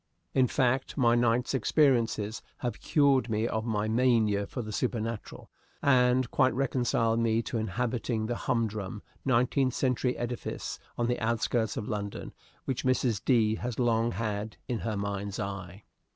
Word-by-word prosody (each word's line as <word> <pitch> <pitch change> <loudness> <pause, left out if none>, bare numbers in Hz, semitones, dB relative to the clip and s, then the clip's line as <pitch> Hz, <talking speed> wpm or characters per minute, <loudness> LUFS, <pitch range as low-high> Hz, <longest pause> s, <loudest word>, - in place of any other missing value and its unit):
In 130 -1 +4
fact, 130 +2 0
my 120 -4 +4
night's 120 +1 +2
experiences 115 -5 +2 0.2
have 120 - -2
cured 140 -4 +3
me 110 +1 0
of 110 0 -2
my 105 -1 0
mania 110 -4 +2
for 125 - -5
the 110 - -6
supernatural, 115 -1 -3 0.3
and 125 -2 +3
quite 130 -3 +3
reconciled 120 -3 +1
me 115 0 +2
to 115 - -3
inhabiting 115 +2 -1
the 120 +2 -2
humdrum, 110 -5 -2 0.2
nineteenth 130 +1 +2
century 125 -1 0
edifice 120 0 -4 0.2
on 120 - +1
the 120 +1 0
outskirts 115 0 0
of 105 - -3
London 100 -2 -4 0.3
which 130 - -2
Mrs. 130 -4 +1
D. 115 -5 +3
has 120 -2 -4
long 120 -1 +2
had 105 0 -3
in 120 -3 -2
her 110 -2 -2
mind's 100 0 -3
eye. 100 -1 -5
115 Hz, 150 wpm, -29 LUFS, 110-125 Hz, 0.3 s, In